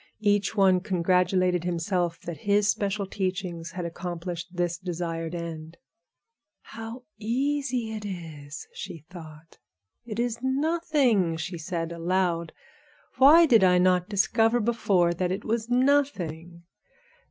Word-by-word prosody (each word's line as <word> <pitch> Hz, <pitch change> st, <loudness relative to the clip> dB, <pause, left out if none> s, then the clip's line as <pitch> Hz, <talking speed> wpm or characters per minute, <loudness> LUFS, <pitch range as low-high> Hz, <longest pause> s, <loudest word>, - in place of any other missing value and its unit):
Each 205 Hz, +1 st, +2 dB
one 190 Hz, -3 st, +4 dB
congratulated 180 Hz, -1 st, +1 dB
himself 175 Hz, 0 st, -1 dB
that 170 Hz, -2 st, -6 dB
his 205 Hz, 0 st, +4 dB
special 200 Hz, 0 st, 0 dB
teachings 185 Hz, -3 st, -4 dB
had 180 Hz, -2 st, -4 dB
accomplished 175 Hz, 0 st, -5 dB
this 175 Hz, -1 st, -1 dB
desired 170 Hz, -2 st, -4 dB
end. 165 Hz, -1 st, -7 dB, 0.9 s
"How 225 Hz, +3 st, -8 dB, 0.2 s
easy 250 Hz, 0 st, -1 dB
it 215 Hz, -1 st, -6 dB
is!" 160 Hz, -7 st, -7 dB
she 160 Hz, -2 st, -8 dB
thought. 160 Hz, -2 st, -12 dB, 0.4 s
"It 225 Hz, -3 st, -7 dB
is 235 Hz, -1 st, -1 dB
nothing," 265 Hz, -, +1 dB
she 170 Hz, +2 st, -5 dB
said 165 Hz, 0 st, -3 dB
aloud; 170 Hz, -1 st, 0 dB, 0.7 s
"why 310 Hz, +6 st, +8 dB
did 230 Hz, -9 st, +5 dB
I 180 Hz, -1 st, +5 dB
not 180 Hz, 0 st, +3 dB
discover 225 Hz, +3 st, +2 dB
before 200 Hz, -6 st, +2 dB
that 180 Hz, +1 st, -1 dB
it 195 Hz, +3 st, -4 dB
was 230 Hz, +1 st, -1 dB
nothing. 200 Hz, -, 0 dB
185 Hz, 120 wpm, -26 LUFS, 170-225 Hz, 0.9 s, why